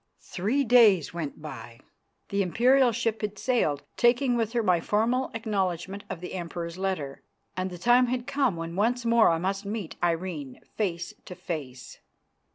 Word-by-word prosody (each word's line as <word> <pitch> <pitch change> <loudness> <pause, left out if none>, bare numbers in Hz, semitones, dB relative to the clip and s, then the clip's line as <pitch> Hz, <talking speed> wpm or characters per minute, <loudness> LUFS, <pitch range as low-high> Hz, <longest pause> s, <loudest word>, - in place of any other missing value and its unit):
Three 220 +10 0
days 220 - +5
went 155 -3 -5
by. 115 -5 -9 0.5
The 200 0 0
Imperial 245 +7 +4
ship 230 -1 -1
had 210 -1 -3
sailed, 195 - 0
taking 245 +1 +3
with 225 -1 -1
her 235 -2 +1
my 180 -4 +3
formal 230 +8 +1
acknowledgment 195 -3 -2
of 170 - -6
the 180 - -7
Emperor's 170 -1 -5
letter, 180 -8 -3 0.3
and 185 +1 -2
the 180 - -8
time 245 +7 +4
had 245 0 -2
come 275 -7 +1
when 165 0 -5
once 235 +5 +1
more 230 -1 +5
I 165 - +2
must 195 +4 -2
meet 205 -4 -5
Irene 165 -6 -2 0.2
face 185 -1 -2
to 180 - -8
face. 135 -9 -7
195 Hz, 165 wpm, -27 LUFS, 170-235 Hz, 0.5 s, days